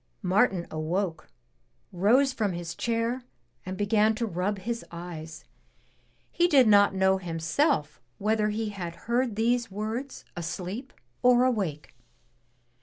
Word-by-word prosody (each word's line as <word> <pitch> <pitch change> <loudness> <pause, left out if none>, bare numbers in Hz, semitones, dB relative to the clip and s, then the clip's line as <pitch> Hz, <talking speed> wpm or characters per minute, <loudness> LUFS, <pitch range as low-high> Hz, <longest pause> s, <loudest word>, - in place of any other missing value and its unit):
Martin 190 -1 +2
awoke, 160 +2 -2 0.6
rose 245 +9 +3
from 210 -7 -1
his 170 -1 -5
chair 230 +5 -1 0.5
and 185 0 -4
began 210 +2 +3
to 230 - -1
rub 195 +1 -2
his 230 +5 -4
eyes. 165 -2 -8 0.9
He 345 - +3
did 270 -8 +5
not 205 -2 +5
know 190 0 +3
himself 165 - 0 0.2
whether 215 +1 +1
he 215 +1 -2
had 175 -5 -6
heard 235 -1 0
these 235 +2 +1
words 220 +7 -5
asleep 180 +9 -5 0.3
or 250 0 +5
awake. 190 - -2
205 Hz, 120 wpm, -27 LUFS, 175-235 Hz, 0.9 s, did